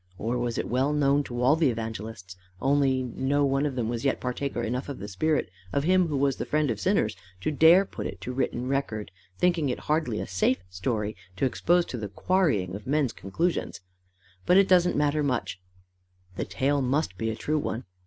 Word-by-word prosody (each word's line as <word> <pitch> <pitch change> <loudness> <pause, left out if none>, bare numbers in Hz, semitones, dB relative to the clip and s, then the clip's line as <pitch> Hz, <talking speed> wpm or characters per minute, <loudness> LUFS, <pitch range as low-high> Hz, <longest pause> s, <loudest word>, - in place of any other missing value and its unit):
Or 120 +4 -2
was 120 -1 -2
it - - -2
well 130 +4 +1
known 145 -1 +3
to 120 0 -3
all 135 +5 +5
the 160 -4 +3
evangelists, 110 -4 -5 0.2
only 135 0 +2
no 135 +3 0
one 135 +2 +1
of 135 - -4
them 120 -3 -1
was 120 0 -3
yet 135 - +1
partaker 125 0 -3
enough 125 +5 -3
of 140 - -5
the 100 - -7
spirit 150 +1 0 0.2
of 140 - 0
him 185 +1 +3
who 150 -3 -1
was 135 -1 +2
the - - -3
friend 150 -3 +1
of 110 - -3
sinners, 145 - +1 0.3
to 155 - 0
dare 165 +6 +6
put - - -5
it 95 0 -8
on 125 - -2
written 125 -1 -1
record, 120 -7 -2 0.3
thinking 170 -5 +2
it 125 - -3
hardly 150 -8 0
a - - -3
safe 95 +3 0
story 105 +3 -2 0.2
to 115 - 0
expose 175 +6 +2
to 125 - -6
the 105 -2 -4
quarrying 105 - +1
of 100 +3 -7
men's 140 -4 +1
conclusions? 165 - -2 0.7
But 180 - +6
it 195 -1 +6
doesn't 180 -1 +4
matter 150 +1 +2
much: 125 -9 -2 0.7
the - - -2
tale 140 +1 0
must 130 - 0
be 110 +4 -2
a 110 - -2
true 150 +6 -1
one. 120 -3 -3
130 Hz, 205 wpm, -27 LUFS, 115-150 Hz, 0.7 s, dare